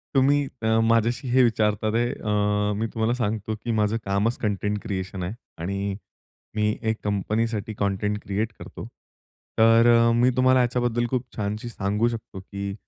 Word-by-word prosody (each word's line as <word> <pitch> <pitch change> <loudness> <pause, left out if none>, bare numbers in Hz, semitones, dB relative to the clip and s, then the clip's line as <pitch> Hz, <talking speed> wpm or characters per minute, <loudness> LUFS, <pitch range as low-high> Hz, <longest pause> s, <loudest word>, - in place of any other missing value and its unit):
तुम्ही 140 +1 +3 0.2
अ, 110 0 +3
माझ्याशी 115 +3 +2
हे 130 +1 +5
विचारतात 110 -2 +1
ते 120 +1 +2
अ, 105 0 0
मी 110 +2 -1
तुम्हाला 115 0 +1
सांगतो 110 -2 -2
की 120 - -2
माझं 110 0 +1
कामच 100 +4 +1
कंटेंट 105 -1 -1
क्रिएशन 95 -1 -4
आहे. 90 +4 -3 0.2
आणि 100 +3 -3 0.6
मी 105 0 +1
एक 110 - 0
कंपनीसाठी 110 +2 -1
कंटेंट 100 +1 0
क्रिएट 105 +3 -2
करतो. - - -9 0.7
तर 115 +1 +6
अ, 115 0 +4
मी 120 +2 +4
तुम्हाला 130 0 +5
याच्याबद्दल 120 -1 0
खूप 125 0 -1
छानशी 105 +1 -3
सांगू 105 +1 0
शकतो, 115 -4 -5
की 100 +1 -5
110 Hz, 155 wpm, -25 LUFS, 105-115 Hz, 0.7 s, तर